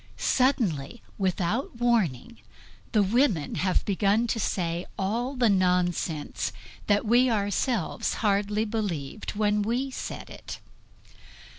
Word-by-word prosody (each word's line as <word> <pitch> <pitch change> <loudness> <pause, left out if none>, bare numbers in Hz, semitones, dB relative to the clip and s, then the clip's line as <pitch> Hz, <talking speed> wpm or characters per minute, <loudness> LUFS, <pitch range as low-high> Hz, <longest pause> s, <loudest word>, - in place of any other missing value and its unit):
Suddenly, 235 - +1 0.2
without 190 +7 -1
warning, 235 - 0 0.5
the 210 -2 +4
women 205 - +2
have 185 0 +1
begun 205 +3 +2
to 225 - 0
say 175 -3 -1
all 235 +8 -1
the 250 -2 +3
nonsense 180 -5 +1 0.4
that 205 +1 +2
we 245 +3 +4
ourselves 205 - 0
hardly 210 0 +1
believed 210 -5 -3
when 210 0 +2
we 245 +6 -1
said - - -6
it. - - -8
210 Hz, 110 wpm, -27 LUFS, 185-235 Hz, 0.5 s, the